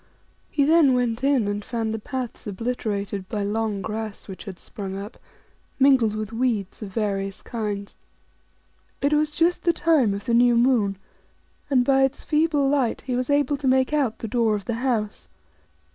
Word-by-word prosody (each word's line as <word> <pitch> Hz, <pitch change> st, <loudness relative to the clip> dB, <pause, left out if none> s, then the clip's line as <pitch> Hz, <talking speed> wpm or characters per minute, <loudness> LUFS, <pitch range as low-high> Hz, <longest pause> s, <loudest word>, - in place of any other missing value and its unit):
' -, -, -38 dB
He 285 Hz, -, +1 dB
then 300 Hz, -3 st, +5 dB
went 245 Hz, 0 st, -1 dB
in, 275 Hz, -5 st, +3 dB
and 205 Hz, 0 st, -2 dB
found 225 Hz, -1 st, -2 dB
the 220 Hz, -, -3 dB
paths 250 Hz, 0 st, -5 dB
obliterated 205 Hz, -3 st, -3 dB
by 210 Hz, -2 st, -2 dB
long 210 Hz, -1 st, -1 dB
grass, 220 Hz, -1 st, -5 dB
which 190 Hz, +1 st, -9 dB
had 190 Hz, -4 st, -7 dB
sprung 195 Hz, 0 st, -7 dB
up, 200 Hz, +2 st, -7 dB, 0.6 s
mingled 260 Hz, -6 st, +4 dB
with 215 Hz, +1 st, -4 dB
weeds 225 Hz, -5 st, -1 dB
of 210 Hz, -, -5 dB
various 195 Hz, -2 st, -2 dB
kinds. 205 Hz, -3 st, -4 dB, 1.0 s
It 285 Hz, +2 st, +1 dB
was 300 Hz, 0 st, +1 dB
just 340 Hz, +2 st, +2 dB
the 340 Hz, -, +3 dB
time 290 Hz, -14 st, +2 dB
of 200 Hz, -, -7 dB
the 235 Hz, -, 0 dB
new 240 Hz, 0 st, +5 dB
moon, 235 Hz, -6 st, +2 dB, 0.7 s
and 255 Hz, -3 st, +3 dB
by 270 Hz, 0 st, +4 dB
its 270 Hz, +1 st, -1 dB
feeble 300 Hz, -2 st, +2 dB
light 270 Hz, -4 st, +1 dB
he 255 Hz, -2 st, -3 dB
was 255 Hz, +1 st, -2 dB
able 285 Hz, 0 st, +2 dB
to 275 Hz, -, -3 dB
make 260 Hz, +2 st, +3 dB
out 270 Hz, -7 st, +1 dB
the 225 Hz, -, -5 dB
door 225 Hz, -1 st, +1 dB
of 200 Hz, -2 st, -5 dB
the 235 Hz, -, -2 dB
house. 225 Hz, -5 st, -1 dB
235 Hz, 180 wpm, -24 LUFS, 210-270 Hz, 1.0 s, then